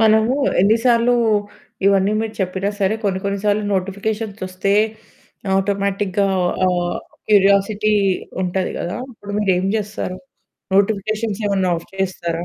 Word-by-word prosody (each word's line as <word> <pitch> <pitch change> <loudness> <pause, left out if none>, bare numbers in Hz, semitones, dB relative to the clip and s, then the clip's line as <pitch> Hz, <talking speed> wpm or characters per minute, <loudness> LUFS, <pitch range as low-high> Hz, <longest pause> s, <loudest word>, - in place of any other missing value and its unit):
మనము 220 +3 +4 0.3
ఎన్నిసార్లు 230 +3 +3 0.7
ఇవన్నీ 200 +1 +3
మీరు 220 -1 -4
చెప్పినా 190 +1 -1
సరే, 195 +2 +2
కొన్ని 190 -2 +1
కొన్ని 200 0 -1
సార్లు 210 0 +2
నోటిఫికేషన్స్ 200 +3 -3
ఒస్తే 185 +2 -1 0.8
ఆటోమేటిక్‌గా 200 0 0 0.4
ఆహ్, 175 -1 0 0.3
క్యురియాసిటీ 205 +1 +3 0.5
ఉంటది 185 +1 -1
కదా! 175 - -3
అప్పుడు 205 -3 -10
మీరేం 190 -2 +1
జేస్తారు? 205 -3 -4 0.6
నోటిఫికేషన్స్ 215 +1 0
ఏమన్నా 190 -2 +1
ఆఫ్ 165 - -9
చేస్తారా? 175 -3 -2
200 Hz, 110 wpm, -20 LUFS, 190-215 Hz, 0.8 s, మనము